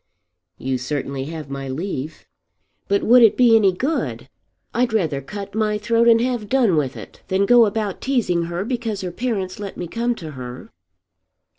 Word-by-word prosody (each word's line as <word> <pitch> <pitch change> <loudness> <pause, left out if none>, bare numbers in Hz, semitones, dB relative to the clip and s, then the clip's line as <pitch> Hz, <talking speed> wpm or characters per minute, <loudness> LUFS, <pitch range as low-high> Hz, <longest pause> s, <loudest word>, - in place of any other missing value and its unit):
"You 130 -1 -2
certainly 135 0 -3
have 155 -2 -7
my 135 -1 -5
leave." 155 0 -5 0.6
"But 200 0 +1
would 245 +2 +6
it 225 -3 +6
be 240 -3 +6
any 205 -4 +5
good? 270 - -3 0.4
I'd 240 -1 +1
rather 160 -10 0
cut 200 +7 -8
my 215 -1 0
throat 230 +2 +2
and 230 -1 +6
have 240 -4 -2
done 245 -9 +3
with 140 -3 -1
it - - -11
than 190 +1 +1
go 235 0 +6
about 205 -2 -3
teasing 215 -11 0
her 175 +3 -3
because 230 -4 -3
her 180 -2 -4
parents 195 -4 -3
let 200 -2 -6
me 175 - -4
come 235 +6 -1
to 160 -7 -8
her." 125 -2 -9
200 Hz, 175 wpm, -21 LUFS, 160-230 Hz, 0.6 s, would